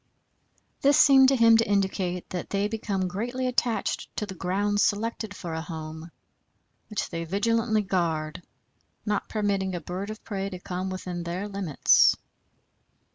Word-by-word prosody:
This 280 0 +5
seemed 270 -2 +7
to 270 - +3
him 230 -2 +6
to 225 -1 +1
indicate 190 -3 0
that 180 -2 -4
they 200 +1 0
become 205 -4 -2
greatly 240 +8 -3
attached 245 -2 -1
to 210 - -2
the 200 - -7
grounds 200 +3 0
selected 215 0 -1
for 170 -4 -6
a 160 - -3
home, 160 0 -7 0.8
which 215 - -3
they 165 -1 -3
vigilantly 220 +4 +1
guard, 165 -5 -1 0.6
not 210 -1 -1
permitting 200 -3 -1
a - - -2
bird 185 +4 -5
of 215 0 -8
prey 195 -2 -3
to 185 - -6
come 180 +1 -4
within 180 -2 -5
their 175 +4 -4
limits. 195 -7 +4
195 Hz, 150 wpm, -26 LUFS, 180-220 Hz, 0.8 s, seemed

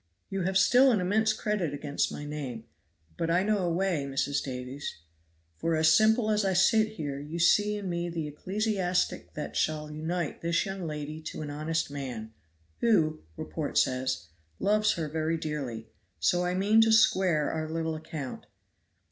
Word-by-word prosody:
You 195 0 -1
have 190 +2 +1
still 250 +7 +6
an 215 - +2
immense 210 +4 +2
Cr. 215 0 -3
against 145 -7 -1
my 145 - -6
name; 140 -6 -5 0.5
but 165 - -1
I 175 +3 +3
know 210 0 +1
a 180 -2 0
way 175 -3 0
Mrs. 140 +1 0
Davies, 130 - -5 0.6
for 165 - +1
as 155 0 +5
simple 220 +2 +4
as 210 0 +2
I 195 -1 +1
sit 215 +4 +4
here 145 -7 -4
you 150 +4 -6
see 205 +5 +4
in 200 -2 -5
me 175 -1 -2
the 165 -2 -3
ecclesiastic 185 +3 -1
that 150 - -5
shall 150 -1 -1
unite 160 +2 -3
this 170 +2 +1
young 195 -3 -4
lady 150 0 -5
to 155 - -5
an 145 - -5
honest 155 +1 -2
man, 125 -6 -6 0.5
who, 160 -9 +2 0.2
report - - -4
says, 130 -8 +1 0.3
loves 210 +1 +2
her 160 -2 -3
very 160 +2 -1
dearly; 135 -8 -4 0.3
so 175 - +2
I 180 0 0
mean 205 +4 +4
to 225 0 +4
square 185 -8 +4
our 155 -1 -3
little 160 0 -2
account." 155 -4 -6
165 Hz, 170 wpm, -29 LUFS, 150-195 Hz, 0.6 s, still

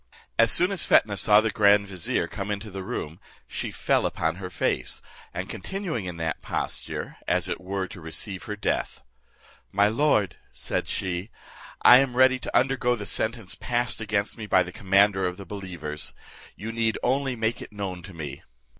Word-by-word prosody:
As 115 - +6
soon 180 +3 +4
as 190 -4 +4
Fetnah 105 -2 +4
saw 105 +1 +5
the 110 0 0
grand 100 -2 +4
vizier, 95 -4 -1
come 100 -1 -5
into 105 +1 -4
the 95 0 -5
room, 80 -2 -5 0.3
she - - -4
fell - - +1
upon 80 +1 -1
her 90 -1 -6
face, - - -1 0.3
and - - -4
continuing 175 - -4
in 90 -2 -5
that 80 -1 -2
posture, - - -3
as - - +2
it - - -3
were 95 +1 -2
to 90 - -10
receive 85 +4 -4
her 105 - -4
death; 105 - -2 0.7
"My 100 +1 +4
lord," 115 -4 +2
said - - -3
she, 95 +1 -3 0.5
"I 125 - +10
am 130 -2 0
ready 130 0 +5
to - - 0
undergo 125 -2 +2
the 105 -3 -6
sentence 110 -1 -1
passed 120 -1 -1
against 105 +1 -1
me 110 - -5
by 95 -2 +4
the 90 - -8
commander 95 0 +3
of 90 0 -4
the 100 - -9
believers; 85 -6 -5 0.4
you 110 +2 -5
need 115 -1 0
only 135 0 +1
make 115 0 -1
it - - -9
known 95 -4 -5
to 95 +1 -11
me." 80 -3 -6
105 Hz, 180 wpm, -26 LUFS, 95-115 Hz, 0.7 s, I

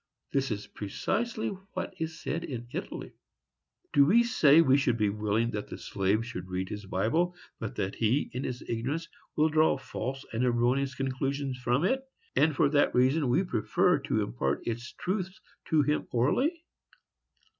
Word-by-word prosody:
—This 135 0 +1
is 105 -2 -3
precisely 215 - -2 0.2
what - - -4
is 160 0 -4
said 165 +3 -3
in 120 -6 -5
Italy. - - -5 0.8
Do 140 - +7
we 230 +8 +6
say 160 -10 +5
we 135 -5 +6
should 135 -4 +2
be 105 -2 +2
willing 105 +2 0
that 105 -2 -4
the - - -7
slave 100 +4 0
should 90 -7 -6
read 95 0 -3
his 105 -1 -6
Bible, 160 - +1 0.2
but 115 - -5
that 95 0 -2
he, 120 +6 +1
in 125 +2 -3
his 125 -1 -4
ignorance, 135 +9 -2 0.3
will 155 +1 +3
draw 155 -2 +3
false 135 +1 -5
and 115 +2 0
erroneous 125 +3 +1
conclusions 135 0 -2
from 125 +4 +1
it, 260 +8 +2 0.3
and 155 -2 +3
for 145 - +4
that 145 0 +3
reason 130 +3 +3
we 150 +10 +3
prefer 110 - +2
to - - 0
impart 65 +3 -2
its 120 +1 -4
truths 190 0 -3 0.3
to 155 -2 +4
him 150 +1 0
orally? 265 - +1
130 Hz, 165 wpm, -29 LUFS, 115-155 Hz, 0.8 s, Do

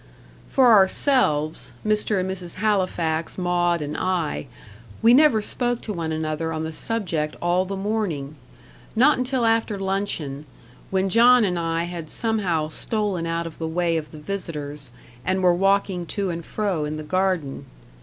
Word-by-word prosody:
For 255 -3 +5
ourselves 160 - +2
Mr. 210 -1 +1
and 185 - -1
Mrs. 185 -2 -5
Halifax, 180 -6 0
Maud 175 -2 +1
and 150 +1 -4
I 175 -6 -1 0.6
we 230 +1 +7
never 255 -6 +5
spoke 245 +1 -1
to 210 - -4
one 165 -3 -3
another 155 +1 -2
on 160 0 -3
the 160 - -3
subject 165 -5 -2
all 175 +2 +1
the 195 +1 -4
morning. 190 -9 -2 0.6
Not 260 +4 +5
until 255 -1 0
after 225 -2 +1
luncheon, 190 -7 -2 0.4
when 190 0 +1
John 240 +4 +6
and 180 -4 0
I 165 0 -1
had 170 -2 -6
somehow 185 -9 0
stolen 200 -1 -2
out 165 0 -2
of 165 - -9
the 160 - -2
way 170 +1 0
of 155 -2 -3
the 155 - -11
visitors, 150 -5 -5 0.3
and 185 0 0
were 180 -1 +5
walking 195 -1 +1
to 195 -1 -2
and 170 0 -5
fro 195 -4 -2
in 150 +1 -3
the 155 - -6
garden. 185 -4 -1
180 Hz, 160 wpm, -23 LUFS, 160-210 Hz, 0.6 s, we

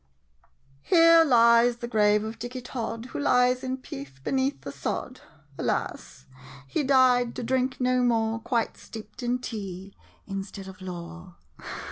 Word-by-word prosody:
] 135 - -36
Here 330 - +6
lies 235 -3 +5
the 240 0 -5
grave 210 -2 +3
of 220 +1 -6
Dicky 245 +2 -5
Tod, 230 -2 -5
Who - - -3
lies 250 -2 +3
in 260 0 -2
peace, 135 - -9
beneath 265 - -1
the - - -7
sod. - - -4 0.4
Alas— - - -3 0.4
he 325 - -1
died 255 -3 +3
to - - -4
drink 260 +2 0
no 255 0 +2
more, 225 -2 +1
Quite 235 0 -1
steeped 215 +1 -10
in 245 0 0
tea— 195 -5 -7 0.3
instead 195 0 -6
of 190 +1 -11
lore! 175 0 -8
235 Hz, 145 wpm, -26 LUFS, 200-255 Hz, 0.4 s, Here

